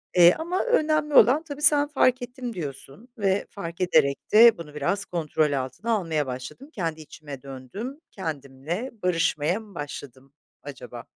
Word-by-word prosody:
Eee, 175 -1 +8
ama 350 +3 -1
önemli 310 -10 +1
olan 280 +4 +6
tabii 290 -2 -8
sen, 295 -1 +5
"Fark 255 -3 +2
ettim" 245 0 -6
diyorsun 145 - -8
ve: 195 -1 +1
"Fark 170 -2 -7
ederek 155 -6 +3
de 230 +1 +8
bunu 155 -3 -10
biraz 195 +8 -1
kontrol 155 -3 0
altına 135 - -3
almaya 165 -9 0
başladım. 130 - -7
Kendi 165 -5 -3
içime 145 -3 -10
döndüm, 140 - -8
kendimle 160 - -5
barışmaya 175 0 +1
mı 210 -4 -15
başladım, 140 -3 -8 0.3
acaba?" 125 -4 -9
175 Hz, 145 wpm, -25 LUFS, -, 0.3 s, Eee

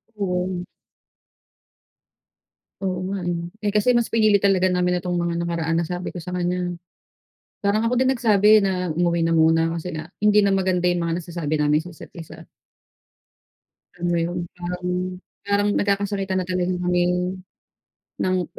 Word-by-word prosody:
Oo. 180 -2 -2 2.2
Oo 185 -2 -1
nga. 195 -3 -3 0.4
Eh, 205 - +1
kasi 210 +3 +2
mas 235 - +2
pinili 215 -2 +5
talaga 190 -2 +3
namin 180 -1 +1
itong 180 -1 -2
mga 170 0 -1
nakaraan 165 -1 -1
nasabi 180 +2 -4
ko 175 - -6
sa 180 - -8
kanya, 180 0 -2 0.8
parang 210 +1 +1
ako 240 +2 +1
din 260 +1 +3
nagsabi 215 -2 +5
na 180 -4 -1
umuwi 170 -1 +1
na 165 - +1
muna 165 +1 +3
kasi 170 +2 -4
nga 155 -1 -6 0.2
hindi 210 0 +5
na 195 - +3
maganda 185 -2 +1
yung 175 -1 +1
mga 165 0 -1
nasasabi 165 -3 -3
namin 150 +1 +3
sa 180 - -10
isa't-isa. 165 0 -11 1.5
Alam 175 - -5
mo 170 - +1
yun 175 +2 -2 0.2
parang 180 0 -4 0.6
parang 205 0 +2
nagkakasakitan 200 -1 0
na - - -9
talaga 180 0 0
kaming 180 +1 0 0.8
nang 185 -2 +1
180 Hz, 145 wpm, -23 LUFS, 170-195 Hz, 2.2 s, pinili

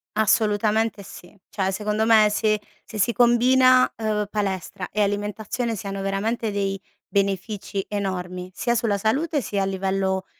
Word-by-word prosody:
Assolutamente 215 0 +1
sì. 180 +1 -13
Cioè 190 -2 -1
secondo 210 +2 -1
me 220 -2 +6
se 215 0 +1 0.2
se 220 - -9
si 210 +3 +2
combina, 255 +2 +5
uhm, 215 -2 -1
palestra 190 -2 -3
e 210 - -1
alimentazione 210 +3 -2
siano 195 -1 -5
veramente 210 +3 -1
dei 195 -1 -2 0.3
benefici 200 0 -2
enormi, 185 -3 -4
sia 235 +4 0
sulla 225 -3 +1
salute 280 +9 0
sia 205 -4 -2
a - - +1
livello, 190 0 -1
210 Hz, 140 wpm, -23 LUFS, 195-225 Hz, 0.3 s, me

